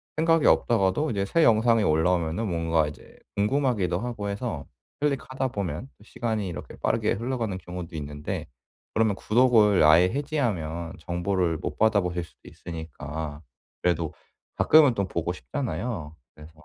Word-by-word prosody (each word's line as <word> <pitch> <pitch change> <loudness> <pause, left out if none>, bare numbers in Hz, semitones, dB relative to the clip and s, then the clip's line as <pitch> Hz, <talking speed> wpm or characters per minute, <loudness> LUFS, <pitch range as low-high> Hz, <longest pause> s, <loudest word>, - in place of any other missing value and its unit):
생각이 165 0 +3
없다가도 115 +6 +3
이제 100 -3 -1
새 165 +11 +2
영상이 115 -1 +4
올라오면은 85 +4 +1
뭔가 80 -3 +1
이제 75 - -11 0.2
궁금하기도 105 - +1
하고 115 -4 -4
해서 100 - -4 0.3
클릭하다 135 -2 -1
보면 100 - -4
또 - - -19
시간이 110 -2 -3
이렇게 80 -4 -7
빠르게 110 -1 0
흘러가는 115 -3 -2
경우도 90 -2 -8
있는데 75 -1 -5 0.5
그러면 110 -2 +2
구독을 110 -4 +4
아예 80 +4 +7
해지하면 100 - -2
정보를 90 -1 -1
못 - - -5
받아보실 95 -5 +2
수도 85 - -17
있으니까 80 -2 -7 0.4
그래도 85 -2 0 0.4
가끔은 150 -6 +6
또 100 -3 -1
보고 85 -1 -2
싶잖아요. 95 - -4 0.2
그래서 75 +1 -14
100 Hz, 355 characters per minute, -26 LUFS, 85-115 Hz, 0.5 s, 아예